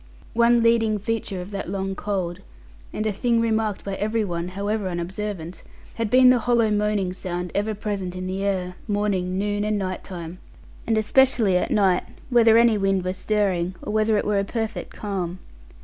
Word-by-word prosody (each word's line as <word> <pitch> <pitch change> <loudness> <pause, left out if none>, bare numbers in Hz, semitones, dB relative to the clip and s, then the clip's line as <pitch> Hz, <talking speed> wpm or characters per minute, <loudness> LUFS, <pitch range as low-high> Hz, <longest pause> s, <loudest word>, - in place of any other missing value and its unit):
One 235 0 +4
leading 225 -2 +3
feature 205 -3 -3
of 180 +3 -9
that 195 -3 -4
long 195 0 -2
cold, 190 -4 -3 0.5
and 215 - -3
a 215 - +1
thing 230 +4 +1
remarked 220 -2 0
by 200 - -4
every 215 +1 0
one 170 -2 -3
(however 200 +2 -2
unobservant) 180 -1 -4 0.3
had 230 -2 -2
been 255 +2 +7
the 250 - +3
hollow 230 -2 +2
moaning 205 -3 0
sound 180 -1 -4
ever 210 +2 -1
present 195 -3 -4
in 185 0 -4
the 190 +1 -3
air, 185 -2 -2
morning, 200 -3 0
noon, 205 +1 -1
and 210 0 0
night 185 -2 -3
time, 175 -1 -7 0.5
and 225 -1 +2
especially 220 -2 +4
at 180 - +1
night, 190 -4 +3 0.3
whether 230 -2 +6
any 230 -2 +4
wind 195 -1 +1
were 185 - -1
stirring, 190 -3 0
or 210 - -4
whether 215 0 +2
it - - -1
were 205 -1 +2
a - - +1
perfect 225 +2 -4
calm. 185 -4 -4
205 Hz, 180 wpm, -24 LUFS, 185-220 Hz, 0.5 s, been